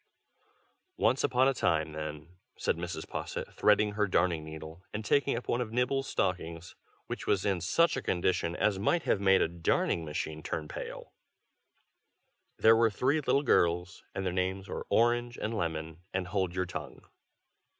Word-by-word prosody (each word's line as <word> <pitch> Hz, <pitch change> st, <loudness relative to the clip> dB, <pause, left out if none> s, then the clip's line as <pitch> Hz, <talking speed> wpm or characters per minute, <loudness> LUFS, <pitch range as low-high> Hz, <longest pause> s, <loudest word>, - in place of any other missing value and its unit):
"Once 130 Hz, -, +2 dB
upon 130 Hz, 0 st, +3 dB
a 135 Hz, -, +3 dB
time, 80 Hz, -9 st, +1 dB
then," 75 Hz, +2 st, -7 dB, 0.2 s
said -, -, 0 dB
Mrs. 85 Hz, -2 st, -5 dB
Posset, -, -, -5 dB
threading 105 Hz, 0 st, +3 dB
her 105 Hz, 0 st, 0 dB
darning 85 Hz, -3 st, +1 dB
needle, 80 Hz, +2 st, -9 dB
and 105 Hz, 0 st, -5 dB
taking 140 Hz, +1 st, +2 dB
up 120 Hz, -, -6 dB
one 120 Hz, -, +1 dB
of 115 Hz, -3 st, -4 dB
Nibble's 125 Hz, +3 st, 0 dB
stockings, 85 Hz, -2 st, -2 dB, 0.3 s
which -, -, -6 dB
was 95 Hz, -, +2 dB
in 95 Hz, -4 st, +1 dB
such 165 Hz, -, +3 dB
a 135 Hz, -, -2 dB
condition 90 Hz, -3 st, 0 dB
as 100 Hz, 0 st, +1 dB
might 165 Hz, -, +1 dB
have 100 Hz, -, +1 dB
made 95 Hz, -1 st, +5 dB
a -, -, +1 dB
darning 85 Hz, 0 st, 0 dB
machine 75 Hz, 0 st, -4 dB
turn 75 Hz, 0 st, -4 dB
pale, -, -, -7 dB, 1.4 s
"there 115 Hz, 0 st, +6 dB
were 115 Hz, 0 st, +4 dB
three 135 Hz, +8 st, +1 dB
little 140 Hz, 0 st, +2 dB
girls, 90 Hz, -5 st, +2 dB
and 95 Hz, -, -2 dB
their 90 Hz, -, -1 dB
names 95 Hz, +1 st, -1 dB
were -, -, -5 dB
Orange 120 Hz, +2 st, +2 dB
and 110 Hz, +1 st, -3 dB
Lemon 80 Hz, -3 st, -3 dB
and 90 Hz, -2 st, -1 dB
Hold 95 Hz, -2 st, -1 dB
your 90 Hz, 0 st, 0 dB
tongue. -, -, -7 dB
95 Hz, 170 wpm, -30 LUFS, 85-115 Hz, 1.4 s, there